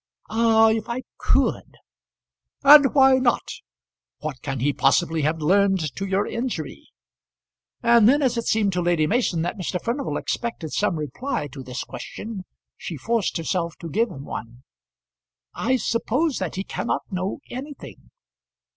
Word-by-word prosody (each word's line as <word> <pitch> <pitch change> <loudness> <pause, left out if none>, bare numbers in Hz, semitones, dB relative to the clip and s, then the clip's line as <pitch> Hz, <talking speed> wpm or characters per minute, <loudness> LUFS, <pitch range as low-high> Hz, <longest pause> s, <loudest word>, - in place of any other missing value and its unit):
"Ah, 225 0 +4
if 220 0 -2
I 245 +2 -3 0.2
could!" - - 0 0.9
"And 280 -1 +8
why 265 -1 +6
not? 250 -2 +1 0.7
What 150 -4 -6
can 135 -3 -4
he 140 +4 +1
possibly 160 +3 +2
have 155 +2 -1
learned 190 -1 +2
to 195 - -4
your 195 +2 +1
injury?" 240 +1 -4 1.0
And 235 -2 +6
then 290 +2 +3
as 250 -2 +2
it 235 - -3
seemed 210 -3 +2
to 180 - 0
Lady 170 -3 +2
Mason 185 -5 +1
that 175 +4 -4
Mr. 180 0 -2
Furnival 250 +7 -2
expected 230 - -4
some 205 -4 +1
reply 155 - -3
to 135 +1 -9
this 125 -1 -5
question, 210 -4 -8 0.3
she 165 - -6
forced 225 - -1
herself 170 0 -2
to 165 -2 -8
give 230 +6 +1
him 140 -5 -9
one. 120 +2 -8 0.9
"I 255 +4 0
suppose 255 +5 0
that 185 -4 -3
he 190 - -2
cannot - - -3
know 185 +1 -2
anything." 275 +3 -9
200 Hz, 150 wpm, -23 LUFS, 165-235 Hz, 1.0 s, And